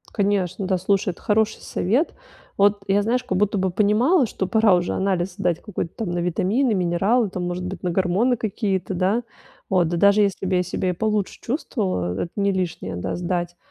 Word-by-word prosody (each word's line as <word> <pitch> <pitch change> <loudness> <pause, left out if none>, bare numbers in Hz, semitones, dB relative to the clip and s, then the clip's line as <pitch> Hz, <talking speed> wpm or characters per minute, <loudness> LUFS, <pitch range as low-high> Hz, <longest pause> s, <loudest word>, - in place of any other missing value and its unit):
Конечно, 195 -2 0
да. 185 0 +1
Слушай, 195 +2 +1
это 175 - -7
хороший 220 +1 +1
совет. 240 - 0 0.4
Вот 200 0 +3
я, 200 +1 +3
знаешь, 245 +4 0
как 245 - -1
будто 205 +1 +1
бы 190 0 +1
понимала, 220 - +3
что 195 -3 -3
пора 220 -1 +4
уже 175 0 -1
анализ 190 -2 -1
сдать 175 -2 -1
какой-то 185 -5 -4
там 215 -6 -4
на 175 - -1
витамины, 195 +8 +1
минералы, 195 +5 +1
там, 185 -1 -4
может 175 +1 -3
быть, 185 0 -6
на 180 - 0
гормоны 190 +8 +2
какие-то, 200 -4 -2
да. 195 +6 +1 0.5
Вот. 180 -4 +2
Да 175 - -1
даже 200 +4 +5
если 200 -1 0
бы 190 0 +1
я 180 - +2
себя 180 +1 -2
и - - -3
получше 210 +1 -1
чувствовала, 200 - -2
э - - -1
это 170 - -7
не 200 -1 +2
лишнее, 175 - -3
да, 90 - -3
сдать. 175 0 -2
195 Hz, 200 wpm, -23 LUFS, 180-210 Hz, 0.5 s, даже